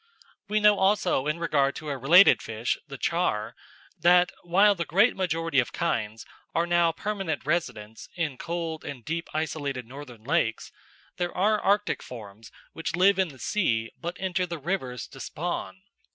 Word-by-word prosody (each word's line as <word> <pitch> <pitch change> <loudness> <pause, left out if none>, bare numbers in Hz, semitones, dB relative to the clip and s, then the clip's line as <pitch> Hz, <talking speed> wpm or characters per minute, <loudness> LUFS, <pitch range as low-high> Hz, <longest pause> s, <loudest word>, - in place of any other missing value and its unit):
We 210 +1 +1
know 210 -1 +5
also 190 -7 +2
in 150 +2 0
regard 140 -5 +1
to 155 - -6
a 140 - -2
related 160 +9 +6
fish, 115 +1 -2
the 140 -2 -8
char, 130 -11 -1 0.4
that 180 +1 +5
while 195 +4 +4
the 170 -3 -3
great 200 +9 +3
majority 165 -5 0
of 125 - 0
kinds 110 -9 -2 0.3
are 165 - +2
now 175 -1 +3
permanent 195 -4 -3
residents 110 -9 -3
in 155 -7 -3
cold 165 -2 -4
and 130 -5 -8
deep, 165 +2 -3
isolated 145 -5 -3
northern 125 -3 -11
lakes, - - 0 0.5
there 175 -1 -3
are 210 +3 +3
Arctic 205 +1 +1
forms 110 -3 -11 0.2
which 165 - -3
live 190 +2 +4
in 190 - +3
the 140 -4 -12
sea 115 - 0
but 175 +1 -6
enter 185 -1 -1
the 170 -1 -5
rivers 135 - -3
to 135 - -13
spawn. 175 +5 -5
165 Hz, 165 wpm, -26 LUFS, 135-180 Hz, 0.5 s, related